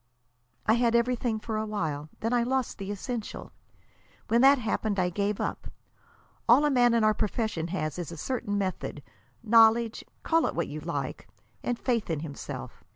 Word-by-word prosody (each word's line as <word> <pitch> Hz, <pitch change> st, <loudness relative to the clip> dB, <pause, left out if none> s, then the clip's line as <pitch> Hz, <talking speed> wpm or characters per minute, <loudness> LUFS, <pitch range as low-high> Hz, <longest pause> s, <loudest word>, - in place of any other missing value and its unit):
"I 215 Hz, -, +4 dB
had 235 Hz, 0 st, +2 dB
everything 235 Hz, -1 st, +1 dB
for 220 Hz, 0 st, -3 dB
a 215 Hz, -, -1 dB
while. 155 Hz, -8 st, -3 dB
Then 225 Hz, +2 st, 0 dB
I 240 Hz, -, +3 dB
lost 255 Hz, 0 st, -1 dB
the 195 Hz, 0 st, -5 dB
essential. 215 Hz, +2 st, -5 dB, 0.8 s
When 235 Hz, +1 st, +4 dB
that 275 Hz, +2 st, +7 dB
happened 220 Hz, -3 st, -1 dB
I 180 Hz, -1 st, +1 dB
gave 200 Hz, +2 st, -1 dB
up. -, -, -3 dB, 0.8 s
All 260 Hz, +6 st, +7 dB
a 295 Hz, -, +3 dB
man 245 Hz, -2 st, +4 dB
in 230 Hz, -, +3 dB
our 215 Hz, 0 st, +5 dB
profession 210 Hz, -6 st, -1 dB
has 160 Hz, -2 st, -3 dB
is 175 Hz, -1 st, -5 dB
a 170 Hz, -, -7 dB
certain 205 Hz, -, -2 dB
method, 185 Hz, -6 st, -3 dB, 0.4 s
knowledge 225 Hz, 0 st, +5 dB, 0.2 s
call 330 Hz, 0 st, +3 dB
it -, -, -4 dB
what -, -, -1 dB
you -, -, -5 dB
like, -, -, -4 dB, 0.3 s
and 245 Hz, -, -1 dB
faith 235 Hz, -6 st, -1 dB
in 160 Hz, -3 st, -1 dB
himself. 150 Hz, -3 st, -7 dB
220 Hz, 175 wpm, -28 LUFS, 195-240 Hz, 0.8 s, that